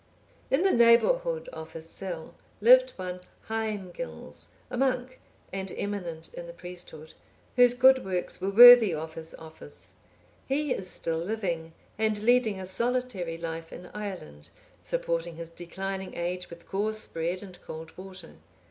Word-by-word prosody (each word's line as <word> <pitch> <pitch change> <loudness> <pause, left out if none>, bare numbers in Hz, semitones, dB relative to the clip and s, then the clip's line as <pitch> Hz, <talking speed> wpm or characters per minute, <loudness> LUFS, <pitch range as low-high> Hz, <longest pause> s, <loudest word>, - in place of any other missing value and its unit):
In 275 +7 +2
the 390 - +4
neighbourhood 485 - +4
of 160 - -9
his 165 0 -9
cell 170 -2 -6 0.3
lived - - +6
one 180 0 -5 0.3
Haemgils, 220 - -5 0.2
a - - -3
monk, 255 0 0 0.3
and 190 -1 -4
eminent 175 -6 -4
in 175 - -7
the 170 - -9
priesthood, 175 -3 -10 0.4
whose 245 -1 +6
good 260 +1 +6
works 185 -1 -3
were 190 - 0
worthy 235 -3 +10
of 160 +1 -5
his 160 0 -8
office: 160 0 -10 0.5
he 285 0 +1
is 185 -1 -5
still 165 -2 -2
living, 170 -4 -3 0.3
and 215 -1 +1
leading 235 -4 +3
a 190 - -5
solitary 205 -4 -2
life 165 0 -6
in 180 - -10
Ireland, 185 - -7 0.3
supporting 170 0 -2
his 165 0 -8
declining 190 +3 -5
age 180 +1 -3
with 170 0 -12
coarse 215 +2 -1
bread 170 +4 -3
and 185 -3 -12
cold 160 0 -9
water. 185 -2 -11
190 Hz, 145 wpm, -28 LUFS, 170-235 Hz, 0.5 s, worthy